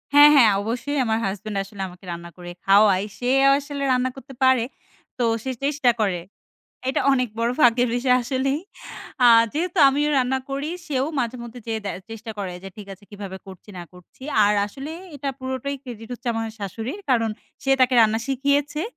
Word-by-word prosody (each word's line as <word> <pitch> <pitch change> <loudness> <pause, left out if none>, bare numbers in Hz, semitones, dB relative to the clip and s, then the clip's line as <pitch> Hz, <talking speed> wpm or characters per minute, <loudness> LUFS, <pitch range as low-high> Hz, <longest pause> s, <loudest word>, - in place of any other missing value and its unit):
হ্যাঁ, 290 +1 +10
হ্যাঁ। 230 -6 +7
অবশ্যই 240 +7 -3
আমার 220 -1 +1
হাসব্যান্ড 200 +1 -4
আসলে 195 0 -10
আমাকে 180 +1 -14
রান্না 170 0 -7
করে 175 0 -8
খাওয়ায়। 200 -1 +5
সে 245 0 -2 0.3
আসলে 285 0 -5
রান্না 255 +1 +1
করতে 270 0 -12
পারে। 260 -3 +5 0.5
তো 245 - 0 0.2
সে 265 - -2
চেষ্টা 280 -3 +2
করে। 195 -5 +1 0.7
এটা 265 - +1
অনেক 250 -2 +1
বড় 230 +1 +1
ভাগ্যের 245 -1 +4
বিষয় 250 +1 +3
আসলেই। 270 +4 -1 0.6
আ - - +8 0.3
যেহেতু 350 +4 -2
আমিও 290 +2 +1
রান্না 260 +1 +1
করি, 280 +3 -3 0.2
সেও 275 -3 0
মাঝে 240 +1 -2
মধ্যে 235 +1 -9
যেয়ে 225 -1 -2
দে 200 - -2 0.2
চেষ্টা 225 +1 -7
করে 190 -3 -3
যে 195 - -7
ঠিক 210 - -9
আছে 200 +2 -14
কিভাবে 200 -2 -7
করছি 190 +2 -12
না 175 - -6
করছি। 180 +7 -18 0.2
আর 210 +1 +3
আসলে 275 +8 -8 0.2
এটা 280 0 -4
পুরোটাই 260 +2 -4
ক্রেডিট 225 -4 -9
হচ্ছে 245 0 -5
আমার 225 0 -2
শাশুড়ির। 225 - -5
কারণ, 230 -3 +2 0.3
সে 270 - 0
তাকে 255 0 +4
রান্না 220 0 +4
শিখিয়েছে। 285 +3 0
245 Hz, 180 wpm, -23 LUFS, 210-270 Hz, 0.7 s, হ্যাঁ